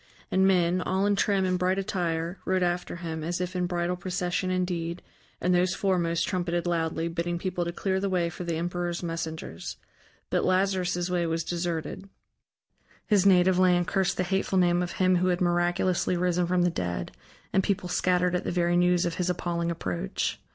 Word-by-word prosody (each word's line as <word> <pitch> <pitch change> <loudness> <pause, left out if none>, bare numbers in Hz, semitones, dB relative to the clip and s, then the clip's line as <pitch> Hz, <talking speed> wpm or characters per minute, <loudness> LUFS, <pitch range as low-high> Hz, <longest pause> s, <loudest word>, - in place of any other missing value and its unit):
And 190 0 +4
men, 180 -1 +3
all 190 +2 0
in 205 0 +3
trim 195 -1 +2
and 185 -1 0
bright 185 +1 +1
attire, 175 -2 -2
rode 185 -1 +1
after 175 0 -1
him, 165 -2 -5
as 175 +2 -2
if 180 0 -3
in 180 -1 0
bridal 175 0 -1
procession 180 0 -2
indeed, 180 -2 -2 0.4
and 180 - +1
those 180 +1 +2
foremost 170 -4 +1
trumpeted 175 -2 -1
loudly, 165 -1 0
bidding 170 +1 -2
people 180 -1 -2
to 170 - -2
clear 190 +2 -1
the 200 0 -1
way 180 -2 +1
for 175 +2 -6
the 170 -1 -2
emperor's 175 +1 -2
messengers. 160 - -5 0.5
But - - +2
Lazarus' 185 -2 +1
way 175 -2 +1
was 165 0 -1
deserted: 175 +3 -3 1.0
his 200 -3 +3
native 185 -1 +5
land 180 -1 +4
cursed 190 0 0
the 185 - +1
hateful 190 +1 0
name 175 -1 +3
of 175 -1 -3
him 185 -1 +3
who 180 +1 +1
had 180 -1 +1
miraculously 175 +1 +1
risen 180 0 +1
from 180 0 +2
the 175 - +2
dead, 85 - -3 0.4
and 190 - +4
people 195 -2 -1
scattered 180 0 +1
at 180 - 0
the - - -2
very 175 0 +1
news 180 0 +3
of 170 - -1
his 180 0 0
appalling 170 -1 -1
approach. 90 - -3
175 Hz, 185 wpm, -27 LUFS, 170-185 Hz, 1.0 s, native